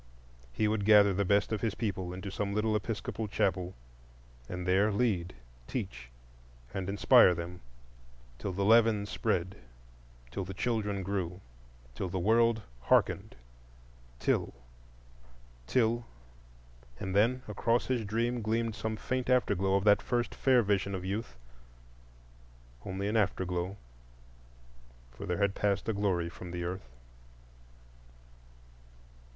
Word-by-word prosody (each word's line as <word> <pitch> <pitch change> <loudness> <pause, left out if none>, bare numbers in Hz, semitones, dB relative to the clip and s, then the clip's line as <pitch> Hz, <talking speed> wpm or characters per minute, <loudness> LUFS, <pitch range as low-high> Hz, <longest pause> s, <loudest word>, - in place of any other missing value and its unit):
He 105 - +1
would 105 -1 0
gather 100 -1 +6
the 100 +2 +1
best 100 +3 +2
of 110 - -1
his 110 -2 -1
people 95 -5 -3
into 95 +2 -6
some 100 +1 -2
little 105 0 +1
Episcopal 110 +1 -3
chapel 90 -3 -1 0.7
and 90 0 -5
there 100 +4 +3
lead, 100 -6 0 0.3
teach, - - -5 0.6
and 95 -1 -3
inspire 100 -1 +6
them, 85 +1 -6 0.8
till 100 - -3
the 100 +2 -1
leaven 110 -1 +5
spread, 95 -3 -1 0.7
till 95 - -3
the 95 0 -7
children 105 -3 -1
grew, 90 -2 -3 0.5
till 90 +7 -4
the 95 - -3
world 110 +3 +3 0.2
hearkened, - - +2 0.8
till—till—and - - -5
then 120 +5 +3
across 115 +3 +1
his 125 -3 0
dream 115 +3 -1
gleamed 115 +1 0
some 110 +1 -3
faint 130 +2 -2
after 125 -5 +3
glow 95 0 +1
of 100 - +2
that 105 -1 +5
first 120 -1 -1
fair 130 -3 +3
vision 100 -1 0
of 90 0 -5
youth—only - - -9
an 110 +2 +1
after 100 -3 +1
glow, 90 +2 -3 1.3
for 80 +11 -8
there 90 - -1
had 100 -1 +1
passed 100 -1 0
a 110 - +1
glory 95 -4 0
from 90 +1 -9
the 85 0 -4
earth. 90 -6 -5
95 Hz, 125 wpm, -31 LUFS, 85-110 Hz, 1.3 s, gather